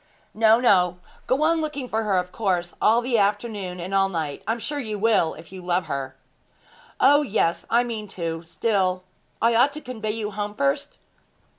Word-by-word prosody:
'No, 220 Hz, +1 st, +5 dB
no; 180 Hz, -7 st, +3 dB, 0.3 s
go 265 Hz, +4 st, +2 dB
on 325 Hz, +1 st, +3 dB
looking 295 Hz, -4 st, -4 dB
for 220 Hz, -2 st, -1 dB
her, 205 Hz, -4 st, +1 dB
of 180 Hz, 0 st, -1 dB
course 180 Hz, -5 st, -1 dB
all 230 Hz, +3 st, +4 dB
the 240 Hz, -2 st, +1 dB
afternoon, 205 Hz, -3 st, -1 dB
and 180 Hz, +3 st, -5 dB
all 195 Hz, 0 st, +3 dB
night. 160 Hz, -6 st, -3 dB
I -, -, +2 dB
am -, -, -4 dB
sure 290 Hz, +5 st, -4 dB
you 215 Hz, -5 st, -4 dB
will, 210 Hz, -6 st, +2 dB
if 160 Hz, +2 st, -13 dB
you 185 Hz, -1 st, -9 dB
love 180 Hz, 0 st, 0 dB
her.' 135 Hz, -2 st, -4 dB, 0.8 s
'O 290 Hz, +2 st, +6 dB
yes; 205 Hz, -, 0 dB
I 235 Hz, +1 st, +4 dB
mean 225 Hz, -3 st, -5 dB
to. 165 Hz, -2 st, -3 dB
Still, 185 Hz, +1 st, 0 dB, 0.4 s
I 230 Hz, +1 st, +4 dB
ought 255 Hz, +5 st, +4 dB
to 305 Hz, -, -6 dB
convoy 225 Hz, -5 st, -5 dB
you 215 Hz, -1 st, -3 dB
home 205 Hz, +1 st, -4 dB
first?' 140 Hz, -6 st, -1 dB
210 Hz, 190 wpm, -24 LUFS, 180-235 Hz, 0.8 s, O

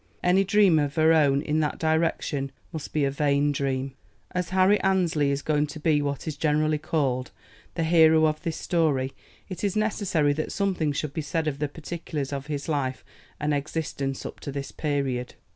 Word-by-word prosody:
Any 180 Hz, +2 st, +4 dB
dream 195 Hz, -4 st, +4 dB
of 145 Hz, -1 st, -1 dB
her 160 Hz, 0 st, +5 dB
own 145 Hz, -3 st, +3 dB
in 155 Hz, +1 st, 0 dB
that 150 Hz, -1 st, 0 dB
direction 160 Hz, -3 st, 0 dB, 0.2 s
must 155 Hz, -2 st, -6 dB
be 150 Hz, -2 st, +1 dB
a 135 Hz, -, 0 dB
vain 145 Hz, 0 st, +2 dB
dream. 135 Hz, -1 st, -2 dB, 0.4 s
As 180 Hz, -1 st, -2 dB
Harry 190 Hz, +2 st, +4 dB
Annesley 175 Hz, -7 st, +2 dB
is 140 Hz, 0 st, -1 dB
going 150 Hz, -1 st, +1 dB
to 150 Hz, +2 st, -8 dB
be 150 Hz, -1 st, +2 dB
what 140 Hz, -1 st, -3 dB
is 155 Hz, -, -2 dB
generally 155 Hz, 0 st, +1 dB
called 135 Hz, -5 st, -1 dB, 0.5 s
the 165 Hz, -, 0 dB
hero 160 Hz, -1 st, +5 dB
of 155 Hz, 0 st, 0 dB
this 165 Hz, -3 st, -3 dB
story, 145 Hz, -6 st, 0 dB, 0.3 s
it 185 Hz, 0 st, -7 dB
is 200 Hz, -1 st, 0 dB
necessary 200 Hz, -9 st, +1 dB
that 155 Hz, +2 st, -3 dB
something 185 Hz, -7 st, 0 dB
should 145 Hz, 0 st, -3 dB
be 160 Hz, -, -2 dB
said 160 Hz, +2 st, -2 dB
of 140 Hz, -2 st, -2 dB
the 150 Hz, -1 st, -1 dB
particulars 150 Hz, -2 st, -5 dB
of 140 Hz, +1 st, -5 dB
his 145 Hz, -2 st, -4 dB
life 140 Hz, -4 st, -2 dB, 0.3 s
and 150 Hz, 0 st, 0 dB
existence 140 Hz, -2 st, -3 dB
up -, -, -7 dB
to 140 Hz, -, -6 dB
this 140 Hz, 0 st, -5 dB
period. 140 Hz, -5 st, -2 dB
150 Hz, 190 wpm, -26 LUFS, 140-165 Hz, 0.5 s, her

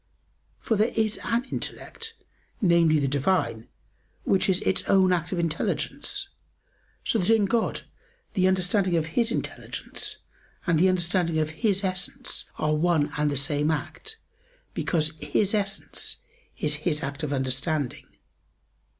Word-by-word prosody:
For 225 Hz, -, 0 dB
there 215 Hz, +3 st, +2 dB
is 220 Hz, -1 st, +1 dB
an 235 Hz, +1 st, +1 dB
intellect, 455 Hz, 0 st, -5 dB, 0.4 s
namely, 170 Hz, -4 st, +4 dB
the 140 Hz, -2 st, +1 dB
Divine, 135 Hz, -5 st, 0 dB, 0.6 s
which 195 Hz, 0 st, +2 dB
is 185 Hz, -1 st, +3 dB
Its 190 Hz, -, +1 dB
own 190 Hz, -2 st, +5 dB
act 170 Hz, -1 st, -1 dB
of 185 Hz, -, -1 dB
intelligence, 175 Hz, -, -1 dB, 0.8 s
so 225 Hz, -, +2 dB
that 185 Hz, +2 st, 0 dB
in 225 Hz, -2 st, +5 dB
God 230 Hz, +2 st, 0 dB, 0.5 s
the 185 Hz, -2 st, +3 dB
understanding 185 Hz, -1 st, +2 dB
of 160 Hz, -, +1 dB
His 235 Hz, -1 st, +2 dB
intelligence, -, -, -4 dB, 0.4 s
and 170 Hz, -3 st, +3 dB
the 185 Hz, +3 st, +5 dB
understanding 175 Hz, -2 st, +1 dB
of 155 Hz, -1 st, 0 dB
His 200 Hz, +3 st, +1 dB
Essence, 190 Hz, +8 st, -2 dB
are 155 Hz, 0 st, +1 dB
one 155 Hz, -2 st, +2 dB
and 150 Hz, 0 st, +1 dB
the 145 Hz, -, 0 dB
same 145 Hz, +2 st, +1 dB
act, 290 Hz, -, -4 dB, 0.6 s
because 155 Hz, -2 st, 0 dB
His 190 Hz, +8 st, +1 dB
Essence 200 Hz, -2 st, -1 dB, 0.4 s
is 150 Hz, -1 st, +2 dB
His 150 Hz, -2 st, 0 dB
act 140 Hz, +2 st, -4 dB
of 150 Hz, -2 st, -2 dB
understanding. 135 Hz, +1 st, -1 dB
175 Hz, 140 wpm, -26 LUFS, 150-200 Hz, 0.8 s, own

